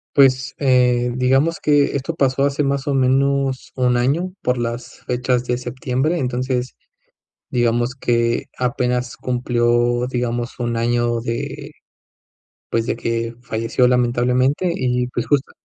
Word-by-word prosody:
Pues, 130 -2 +4
eh, 125 -2 +2
digamos 135 +6 +2
que 145 -2 +3
esto 140 +4 -3
pasó 135 -1 +1
hace 140 +1 +1
más 140 0 -1
o 140 - +1
menos 135 0 +1
1, 125 -1 +2
año 150 +10 0
por 125 0 0
las 120 0 -4
fechas 125 0 0
de 125 0 0
septiembre, 130 +5 -1
entonces, 125 -2 -2 0.7
digamos 120 0 +1
que 120 -2 0
apenas 125 -1 -1
cumplió, 120 -1 +1
digamos, 120 -1 -3
1, 120 -1 -1
año 120 0 +1
de, 140 +5 -4 1.0
pues, 115 -1 0
de - - -2
que 115 0 -2
falleció, 115 +1 +1
lamentablemente, 125 +6 +2
y, 125 -1 0
pues, 120 -1 -3
justo 145 -2 +1
125 Hz, 130 wpm, -20 LUFS, 120-135 Hz, 1.0 s, Pues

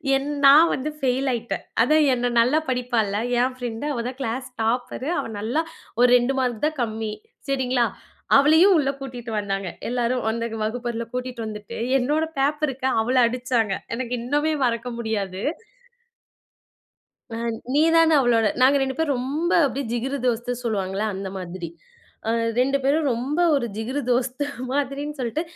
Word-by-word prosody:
என் 270 +2 -1 0.2
நான் 305 +5 +8
வந்து 275 +4 -2
ஃபெயில் 265 0 0
ஆயிட்டேன். 235 -1 -3 0.2
அதா 305 +6 +4 0.2
என்ன 245 0 0
நல்லா 255 +7 +4
படிப்பால்ல, 240 -5 0 0.2
என் 255 +1 +1
பிரண்ட். 240 +1 -4
அவதான் 245 +1 -4
கிளாஸ் 255 +2 -3
டாப்பரு. 245 +5 -1
அவ - - -3
நல்லா 240 +10 0 0.4
ஒரு 250 - +7
2 245 +2 0
மார்க் 245 -3 -1
தான் 310 +1 0
கம்மி. 220 -1 -2 0.4
சரிங்களா? 255 -3 +1 0.5
அவளையும் 320 +7 +6
உள்ள 280 -3 +1
கூட்டிட்டு 245 -3 -7
வந்தாங்க, 195 -2 -3 0.2
எல்லாரும் 245 +1 0
அந்த 230 +1 -2 0.2
வகுப்பறைல 235 +1 -3
கூட்டிட்டு 250 -2 -4
வந்துட்டு, 210 -1 -7 0.2
என்னோட 300 +5 +1 0.2
பேப்பருக்கு 275 -2 0
அவள 245 +4 0
அடிச்சாங்க. 240 -4 0 0.2
எனக்கு 250 0 -3
இன்னுமே 295 +5 0
மறக்க 235 0 -1
முடியாது. 200 -4 -3 1.9
அ - - -4 0.4
நீதானே 325 +1 +5
அவளோட 235 -3 +3 0.2
நாங்க 265 +2 +6
2 265 -1 -1
பேரும் 310 -4 +1
ரொம்ப 290 +8 -2
அப்படியே 275 -1 -2
ஜிகிரு 265 +4 -2
தோஸ்து 240 0 0
சொல்லுவாங்கள்ல, 200 -2 -1
அந்த 190 0 -5
மாதிரி. 180 -1 -6 0.6
அ - - +1 0.3
2 275 +2 +3
பேரும் 295 +4 +2
ரொம்ப 265 +7 -2 0.2
ஒரு 265 - 0
ஜிகிரு 255 +6 -2
தோஸ்து 255 +3 0 0.2
மாதிரினு 285 +2 -2
சொல்ட்டு, 250 +5 -1
250 Hz, 145 wpm, -23 LUFS, 230-275 Hz, 1.9 s, நான்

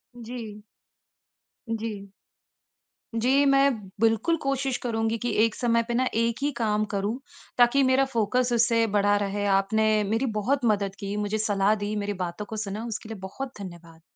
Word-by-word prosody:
जी। 225 -3 -8 1.1
जी। 215 -3 -4 1.0
जी, 260 +5 +3
मैं 275 0 +5 0.3
बिल्कुल 225 +9 +2
कोशिश 275 -2 0
करूँगी 225 -1 0
कि 245 - 0
एक 225 - -2
समय 230 -2 +2
पे 240 - -2
ना 255 +2 +2
एक 230 0 +1
ही 290 +1 +1
काम 215 -2 +1
करूँ 200 +4 -1 0.4
ताकि 245 +3 +5
मेरा 260 +1 +4
फ़ोकस 240 +3 +1
उससे 230 -1 +3
बढ़ा 205 0 +4
रहे। 205 +1 -2
आपने 215 +2 +2
मेरी 225 +5 +1
बहुत 260 +5 0
मदद 200 -3 +1
की, 200 0 -4
मुझे 210 +1 -1
सलाह 205 -1 +2
दी, 210 0 -3
मेरी 205 0 -2
बातों 175 +4 -5
को 220 - -7
सुना 210 +2 -4
उसके 225 -1 -6
लिए 220 - -6
बहुत 265 +7 -6
धन्यवाद। 170 -3 -10
225 Hz, 160 wpm, -26 LUFS, 205-240 Hz, 1.1 s, मैं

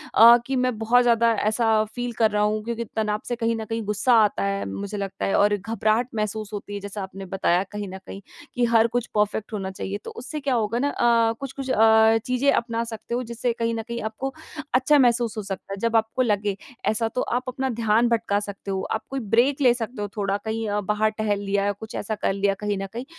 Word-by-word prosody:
अ, 235 +2 +9
कि 270 - -1
मैं 255 -2 0
बहुत 235 +3 +4
ज़्यादा 235 -1 +4 0.2
ऐसा 220 -1 +2
फील 245 -1 -3
कर 220 -1 +4
रहा 210 0 +1
हूँ 210 0 0
क्योंकि 235 +1 -3
तनाव 210 -1 0
से 240 - -1
कहीं 230 -1 0
न 220 -1 -4
कहीं 225 0 -2
गुस्सा 210 +4 +2
आता 200 - 0
है 100 0 -1
मुझे 200 - -5
लगता 195 -1 -4
है 195 - +1
और 205 0 +4
घबराहट 220 +3 0
महसूस 215 0 -3
होती 205 0 -6
है 205 - -3
जैसा 200 +1 -6
आपने 190 +1 -8
बताया 185 -1 +1
कहीं 210 -1 -5
न - - -6
कहीं, 195 - -8 0.3
कि 245 -1 +2
हर 230 -1 +4
कुछ 240 0 -2
परफ़ेक्ट 210 +1 0
होना 195 -2 -3
चाहिए। 190 +1 -4
तो - - -6
उससे 290 +6 -6
क्या 275 -2 -1
होगा 230 +1 0
ना 285 +3 +1
अ, 230 -3 +3
कुछ-कुछ 275 0 -6
अ, 220 0 +5
चीज़ें 255 +3 +2
अपना 230 -3 0
सकते 230 0 -5
हो 250 - -1
जिससे 235 +1 -2
कहीं 230 0 0
न 225 - -2
कहीं 235 0 -4
आपको 220 +5 -4 0.4
अच्छा 265 +4 +4
महसूस 235 -3 +2
हो 215 - -3
सकता 195 0 -6
है। - - -5
जब 230 - -3
आपको 225 +3 +1
लगे 205 -4 0 0.3
ऐसा 220 +1 +1
तो 250 - +1
आप 245 +1 -1
अपना 265 +1 -2
ध्यान 230 0 +2
भटका 225 -3 +1
सकते 200 -1 -6
हो, 190 -1 -1
आप 220 - -1
कोई 270 - -3
ब्रेक 245 +6 +2
ले 250 -3 +6
सकते 240 -1 -5
हो 205 - -2
थोड़ा 200 -1 0
कहीं 220 0 -2
अ, 205 0 0
बाहर 210 +2 +1
टहल 215 -1 -1
लिया 200 0 0
या 205 - +2
कुछ 215 +3 -9
ऐसा 215 +2 -3
कर 205 - -1
लिया 200 0 +1
कहीं 210 -1 -1
न 195 - -3
कहीं। 240 +3 -5
220 Hz, 240 wpm, -24 LUFS, 205-235 Hz, 0.4 s, अ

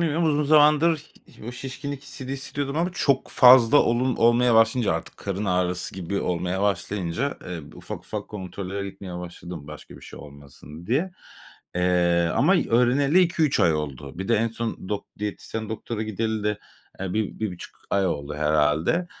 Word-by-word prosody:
bilmiyorum. 165 0 +1
Uzun 150 -1 +2
zamandır 150 +1 +4
ih - - -18
o - - -5
şişkinlik 135 +2 -6
hissini 135 -2 -7
hissediyordum 140 +1 -4
ama 175 +3 +1
çok 140 -6 +1
fazla 125 +1 +7
olun 125 +1 +2
olmaya 120 +1 +4
başlayınca 115 -1 +4
artık - - -5
karın 100 +1 -4
ağrısı 90 -1 -1
gibi 95 +2 -3
olmaya 90 +2 -1
başlayınca, 100 +5 -1
eee, 90 -2 -5
ufak - - -7
ufak - - -7
kontrollere 100 0 -5
gitmeye 90 -3 -8
başladım 85 -3 -8
başka 75 -1 -11
bir - - -13
şey - - -11
olmasın 75 +3 -12
diye, 165 +10 0 0.6
eee, 90 -1 +2
ama 175 +8 +4
öğreneli 135 +8 +4
2-3 165 -5 +2
ay 80 -2 +4
oldu. 70 0 -5
Bir 95 - -4
de 115 - +4
en 115 +2 +1
son 115 -4 -5
dok 105 -1 -3
diyetisyen 105 +1 -5
doktora 110 0 -4
gideli 110 0 -2
de, 105 0 0 0.4
eee, 95 -2 -3
1-1.5 110 -3 -4
ay 100 -1 +2
oldu 75 -3 -3
herhalde. 75 - +1
105 Hz, 160 wpm, -24 LUFS, 90-135 Hz, 0.6 s, fazla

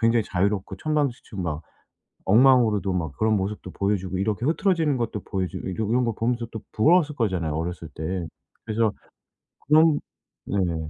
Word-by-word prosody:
굉장히 115 0 +3
자유롭고 95 +1 -1
천방지축 140 -7 -2
막 80 -2 -3 0.6
엉망으로도 110 -3 +5
막 80 -5 -2
그런 110 0 +3
모습도 95 -1 -4
보여주고 95 -2 -1
이렇게 105 +3 -1
흐트러지는 160 -5 +2
것도 110 -3 -2
보여주고 95 -1 -3
이 - - -3
이런 110 +6 0
거 115 - 0
보면서 120 +2 -1
또 110 - -5
부러웠을 155 +5 +4
거잖아요, 90 -9 0
어렸을 85 0 -4
때. 85 +2 -3 0.4
그래서 110 -1 +1 0.8
그런 155 0 +5 0.5
네네. 85 -6 -1
105 Hz, 375 characters per minute, -25 LUFS, 95-120 Hz, 0.8 s, 엉망으로도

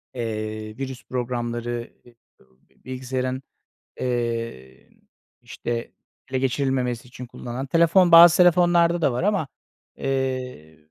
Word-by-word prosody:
Eee, 110 -2 -5
virüs 130 -2 -6
programları, 120 -1 -4 0.9
bilgisayarın, 130 0 -3 0.6
eee, 115 - -3
n - - -29 0.4
işte, 120 -1 -5 0.4
ele 130 - 0
geçirilmemesi 130 -2 -1
için 125 0 -9
kullanılan 125 +2 -6
telefon, 170 +4 +4
bazı 170 0 +9
telefonlarda 175 -1 +4
da 135 - +3
var 120 - -2
ama, 200 -6 0 0.5
eee, 130 - -3
130 Hz, 100 wpm, -23 LUFS, 120-140 Hz, 0.9 s, bazı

